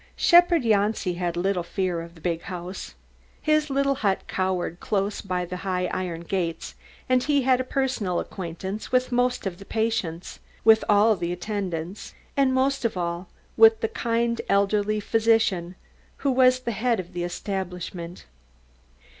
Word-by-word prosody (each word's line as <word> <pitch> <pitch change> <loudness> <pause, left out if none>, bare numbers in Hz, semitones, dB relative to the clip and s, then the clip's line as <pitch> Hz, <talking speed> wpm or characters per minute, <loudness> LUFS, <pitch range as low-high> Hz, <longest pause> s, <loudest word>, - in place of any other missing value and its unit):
Shepherd 345 -3 +5
Janci 210 -4 +1
had 175 -1 -2
little 185 +1 0
fear 175 -1 -2
of 170 +1 -11
the 165 - -16
big 170 -1 -1
house. 180 0 -7 0.4
His 305 -1 +1
little 275 0 +2
hut 205 -8 0
cowered 185 -2 -2
close 200 0 -1
by 180 -2 -2
the 180 +1 -6
high 180 -1 -1
iron 175 -3 -3
gates, 170 -2 -3 0.3
and 255 0 +3
he 285 0 +2
had 255 0 +3
a - - -2
personal 255 -9 -1
acquaintance 190 +3 -6
with 255 0 +2
most 245 -1 +1
of 180 -2 -4
the - - -9
patients, 220 -6 -2 0.2
with 220 0 +6
all 210 +2 +5
of 205 - +1
the 170 0 -2
attendants, 180 -1 -4 0.2
and 275 -2 +3
most 265 +1 +1
of 225 -5 -1
all, 170 +1 -3 0.3
with 445 0 +6
the 450 - +1
kind 235 - -1
elderly 205 +1 +2
physician 215 -5 +1 0.5
who 275 - +4
was 255 0 +4
the 235 - -2
head 230 0 0
of 185 0 -7
the 175 0 -3
establishment. 180 -2 -5
200 Hz, 160 wpm, -25 LUFS, 180-245 Hz, 0.5 s, with